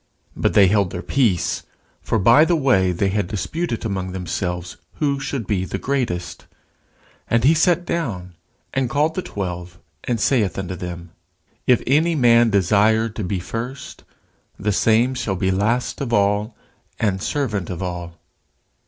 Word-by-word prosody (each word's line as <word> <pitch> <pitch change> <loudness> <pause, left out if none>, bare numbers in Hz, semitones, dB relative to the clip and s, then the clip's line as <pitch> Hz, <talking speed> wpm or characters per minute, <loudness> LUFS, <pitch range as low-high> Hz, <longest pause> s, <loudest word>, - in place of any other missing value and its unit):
But - - 0
they 100 - +7
held 100 -1 +2
their 90 +1 -6
peace: 115 -11 +1 0.4
for - - 0
by 115 +9 +6
the 170 +1 +2
way 125 - +3
they 95 +3 0
had 100 -1 -1
disputed 115 - -3
among 95 -3 -3
themselves 90 -1 -4 0.2
who 140 -2 0
should 135 -4 -4
be 95 -2 0
the 95 - -4
greatest. 120 -8 -3 0.8
And 115 0 +2
he 145 +5 +6
sat 175 +2 +2
down, 100 - -3 0.4
and 135 -2 0
called 150 +5 +1
the 185 - -2
twelve, 90 - -6 0.3
and 120 -2 -1
saith 110 -4 +1
unto 95 -1 -4
them, 85 -1 -7 0.6
If 125 -2 +4
any 160 +6 +2
man 120 -4 +5
desire 105 +3 +3
to 110 0 -6
be 95 +1 -2
first, 115 +9 -6 0.5
the 105 +2 -1
same 115 +5 +3
shall 120 -6 -2
be 95 0 0
last 110 +9 0
of 130 -4 -3
all, 105 +1 +1 0.4
and 100 -4 0
servant 110 - -2
of 90 0 -4
all. 85 -2 -5
105 Hz, 155 wpm, -21 LUFS, 95-130 Hz, 0.8 s, they